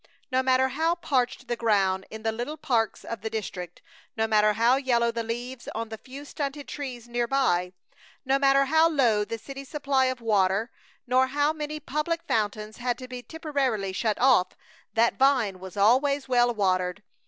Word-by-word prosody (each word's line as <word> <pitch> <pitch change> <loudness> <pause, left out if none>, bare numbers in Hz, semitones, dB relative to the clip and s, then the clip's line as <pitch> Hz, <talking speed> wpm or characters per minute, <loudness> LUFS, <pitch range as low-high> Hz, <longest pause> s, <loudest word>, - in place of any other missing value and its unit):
No 260 0 +3
matter 260 0 +3
how 320 +6 +1
parched 265 -6 -1
the 240 - -1
ground 195 -5 +1
in 220 0 -9
the 225 - +1
little 240 +8 -5
parks 230 -6 0
of 230 - -6
the 220 - -3
district, 180 -5 -6 0.3
no 220 - +2
matter 215 -1 +3
how 230 +4 +4
yellow 240 -4 +1
the 230 0 -3
leaves 240 +2 -5
on 225 0 -3
the 220 - -6
few 275 +2 -10
stunted 285 -1 -5
trees 255 -5 -6
near 240 0 -1
by, 180 -10 +1 0.5
no 270 +1 +2
matter 275 0 +4
how 320 +4 +4
low 240 -9 +2
the 230 +2 -5
city's 275 +4 -9
supply 280 -3 +1
of 255 -1 -1
water, 210 0 +1 0.3
nor 255 +1 +3
how 290 +3 +1
many 305 0 -5
public 305 +3 -2
fountains 215 0 -1
had 245 -1 -1
to 255 - -9
be 250 -1 -7
temporarily 265 -10 -2
shut 215 +2 0
off, 245 -8 +4 0.4
that 230 +3 +2
vine 255 -9 +3
was 190 +1 -10
always 265 +7 +3
well 245 -1 +3
watered. 185 -2 0
245 Hz, 180 wpm, -26 LUFS, 220-275 Hz, 0.5 s, how